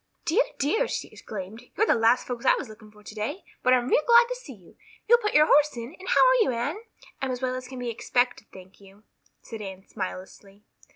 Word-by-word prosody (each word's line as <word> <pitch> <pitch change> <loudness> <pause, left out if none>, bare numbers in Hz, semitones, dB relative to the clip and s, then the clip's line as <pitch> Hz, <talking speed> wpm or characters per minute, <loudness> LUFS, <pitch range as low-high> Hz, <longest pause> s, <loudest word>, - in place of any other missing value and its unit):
"Dear, 345 +8 +3 0.2
dear," 440 - +1
she - - -4
exclaimed, 210 +2 -8 0.2
"you're 435 - +4
the - - +4
last 230 +2 +3
folks 245 -2 -5
I - - +5
was - - -5
looking 215 0 -14
for 210 0 -19
today, 215 - -5 0.2
but 255 - +2
I'm 250 -1 +3
real 285 - +3
glad 475 0 +7
to - - -2
see 330 - -11
you. 185 -4 -20 0.3
You'll 475 +2 +6
put 420 -3 -2
your 300 0 +7
horse 295 -3 +3
in? 235 +7 -7
And 375 - -8
how - - +5
are - - +4
you, - - +2
Anne?" 280 - -3 0.4
"I'm 265 - -1
as 250 0 -4
well 255 0 0
as 255 0 -6
can 260 0 -9
be 245 -1 -3
expected, 245 0 -1
thank 190 +1 -15
you," 195 +2 -18 0.4
said 225 -2 -8
Anne 190 -1 -9
smilelessly. 195 +1 -8
245 Hz, 230 wpm, -26 LUFS, 210-305 Hz, 0.4 s, glad